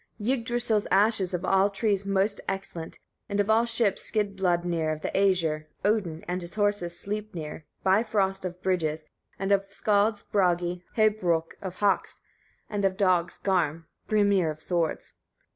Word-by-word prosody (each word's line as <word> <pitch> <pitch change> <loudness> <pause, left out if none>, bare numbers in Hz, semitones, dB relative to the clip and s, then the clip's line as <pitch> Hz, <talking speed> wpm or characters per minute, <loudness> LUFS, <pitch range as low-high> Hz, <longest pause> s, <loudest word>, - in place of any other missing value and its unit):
44. 235 +5 +1
Yggdrasil's 235 -3 0
ash 210 +2 +4
is 185 -1 -1
of 180 +1 -3
all 195 +1 +4
trees 200 -1 0
most 200 +1 +1
excellent, 175 -4 -5 0.3
and 200 0 -1
of 205 +1 +2
all 225 +2 +4
ships, 225 -4 0
Skidbladnir, 175 -6 0
of 155 0 -4
the - - -2
Æsir, 170 -6 +2 0.2
Odin, 195 -7 0
and 180 +1 -2
of 170 0 -7
horses, 205 -5 0
Sleipnir, 185 -8 -5 0.2
Bifröst 195 -1 +2
of 180 -1 -5
bridges, 160 -4 0 0.3
and 195 +1 -2
of 195 0 +2
skallds, 205 +1 +1
Bragi, 180 -2 0
Hâbrôk 185 -7 +2
of 185 -2 -5
hawks, 200 0 0 0.5
and 205 -2 -3
of 190 -1 +1
dogs, 180 -4 +2
Garm, 165 -4 0 0.2
[Brimir 200 -5 +3
of 155 0 -5
swords. 170 0 -2
195 Hz, 150 wpm, -27 LUFS, 175-205 Hz, 0.5 s, ash